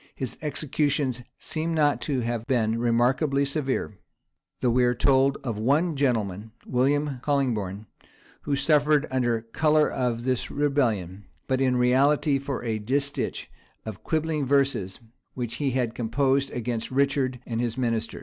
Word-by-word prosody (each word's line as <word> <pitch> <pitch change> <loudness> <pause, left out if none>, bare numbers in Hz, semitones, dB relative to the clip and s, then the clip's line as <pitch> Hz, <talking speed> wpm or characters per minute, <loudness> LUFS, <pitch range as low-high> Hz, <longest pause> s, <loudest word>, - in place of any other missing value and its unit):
His 130 -3 -4
executions 145 -3 -1 0.2
seem 165 +1 -2
not 145 -2 +2
to 135 -4 -1
have 115 -1 -3
been 115 -3 +1
remarkably 130 +4 +2
severe; 135 -7 -2 0.6
though 125 - +2
we 125 +1 +3
are 125 0 +2
told 135 +2 +3
of 115 -5 -3
one 150 +8 +2
gentleman, 110 -6 -1
William 140 +2 +1
Colingbourne, 110 -9 -1 0.6
who 145 - -1
suffered 150 +1 +3
under 120 -3 +1
color 150 +7 +2
of 120 -2 -2
this 130 -1 -1
rebellion, 110 -10 0 0.2
but 130 0 0
in 130 -1 +2
reality 135 +3 +3
for 135 -2 -4
a 110 -2 -2
distich 140 +6 -2 0.4
of 110 -1 -7
quibbling 155 -1 -1
verses 135 -9 +1 0.4
which 120 -3 -4
he 145 -2 0
had 125 -3 -1
composed 135 +4 +1
against 120 -2 -3
Richard 135 -1 +1
and 115 -1 -2
his 120 -1 -2
ministers. 115 -3 -2
130 Hz, 140 wpm, -26 LUFS, 115-140 Hz, 0.6 s, we